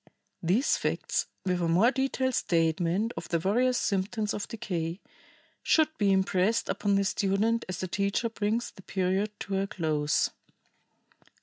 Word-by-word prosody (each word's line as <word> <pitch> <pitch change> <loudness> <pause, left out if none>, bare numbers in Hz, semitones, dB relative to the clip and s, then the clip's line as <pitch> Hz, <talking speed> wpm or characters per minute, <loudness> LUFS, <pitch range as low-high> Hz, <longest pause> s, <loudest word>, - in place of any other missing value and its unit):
These 195 - +2
facts, - - -1 0.2
with 180 -1 0
a 170 - +1
more 185 +9 +4
detailed 265 0 0
statement 170 +5 +1
of - - -7
the 170 - +2
various 245 +9 +2
symptoms 210 +2 -1
of 205 - -4
decay, 175 -5 -4 0.6
should 315 0 +3
be 200 -2 +3
impressed 190 +3 +2
upon 205 -1 +1
the 200 - +3
student 200 +4 +1
as 185 - -4
the 185 - -2
teacher 200 +5 0
brings 220 +2 -1
the - - -14
period 190 +3 -1
to 195 -1 -1
a 195 - -1
close. 155 -6 0
195 Hz, 145 wpm, -28 LUFS, 180-225 Hz, 0.6 s, more